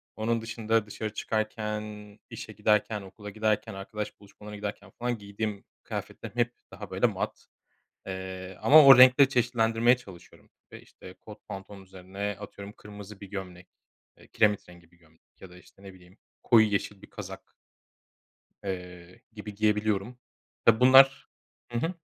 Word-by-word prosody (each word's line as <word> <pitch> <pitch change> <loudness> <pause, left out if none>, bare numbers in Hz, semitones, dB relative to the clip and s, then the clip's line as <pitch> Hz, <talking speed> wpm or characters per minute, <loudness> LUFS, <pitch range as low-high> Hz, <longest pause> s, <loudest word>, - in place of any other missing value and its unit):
Onun 115 +1 -1
dışında 115 -1 -1
dışarı 105 0 -6
çıkarken, 110 -1 -2 0.5
işe - - -8
giderken, 105 0 +1
okula 105 +2 -10
giderken, 110 -1 -1
arkadaş 105 +2 -6
buluşmalarına 105 +1 -12
giderken 100 -1 -6
falan 120 -1 -1
giydiğim 100 0 -5 0.2
kıyafetlerim - - -7
hep 120 0 +1 0.2
daha, - - -9
böyle, - - +2
mat, - - -5 0.6
eee, 95 -1 -7
ama 155 +1 +8
o 135 -2 +10
renkleri 130 +2 +8
çeşitlendirmeye 120 -1 +2
çalışıyorum 95 -8 -15 0.2
ve, - - -11
işte, 90 - -14
kot 105 -1 -14
pantolonun 95 0 -9
üzerine, 95 +2 -6
atıyorum, 100 0 -9
kırmızı 105 -1 -12
bir 100 - -8
gömlek, 90 -2 -8 0.5
eee, - - -19
kiremit 105 -3 +1
rengi 85 -1 -17
bir 90 - -26
gömlek 80 -1 -29
ya 95 - -12
da, 90 - -14
işte, 95 - -21
ne 95 -1 -11
bileyim, 90 +2 -19 0.2
koyu 110 -2 +5
yeşil 100 -1 -3
bir - - -14
kazak 95 -2 -10 1.1
eee, 90 -2 -7
gibi 105 -1 -9
giyebiliyorum. 105 +2 0 0.5
Tabii, 115 0 +5
bunlar, 135 +1 +6 0.4
hı 120 - -1
hı. 165 +8 -2
105 Hz, 145 wpm, -28 LUFS, 95-115 Hz, 1.1 s, o